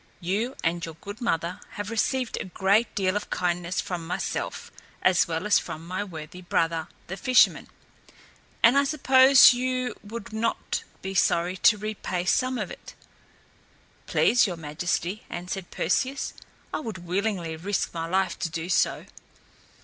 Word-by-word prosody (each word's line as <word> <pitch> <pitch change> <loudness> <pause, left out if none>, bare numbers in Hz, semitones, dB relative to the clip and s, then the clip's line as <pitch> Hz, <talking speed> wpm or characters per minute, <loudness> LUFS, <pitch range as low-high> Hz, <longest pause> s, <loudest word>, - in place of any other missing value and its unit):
You 210 +9 -1
and 170 +1 0
your 165 -1 -5
good 205 +8 -9
mother 170 -6 -1
have 205 +1 -5
received 250 +2 0
a - - -4
great 195 +5 +1
deal 190 -1 +1
of 210 - -3
kindness 175 0 -1
from 170 -3 -4
myself, 175 - -3 0.3
as 185 -1 +4
well 165 +3 -3
as 210 -3 +5
from 160 +1 -7
my 185 +3 -3
worthy 165 -2 -9
brother 165 -2 0 0.2
the 190 - -5
fisherman, 250 +6 +4 1.0
and 240 +4 +7
I - - +3
suppose 265 -2 +7
you 255 0 -1
would 215 0 -8
not 225 +1 -1 0.2
be 190 0 -4
sorry 180 -1 +2
to 210 +3 +5
repay 205 -4 -3
some 255 +7 +1
of - - -4
it." - - -11 1.1
"Please, 240 -2 +4
your 175 -3 -4
Majesty," 170 +5 -2
answered 180 +1 -5
Perseus, 260 +11 -1 0.4
"I - - -1
would 215 - -7
willingly 180 -3 -1
risk 190 +5 -2
my 165 -1 -3
life 185 +1 0
to 165 - -2
do 165 +2 -5
so." - - +1
190 Hz, 150 wpm, -26 LUFS, 175-225 Hz, 1.1 s, and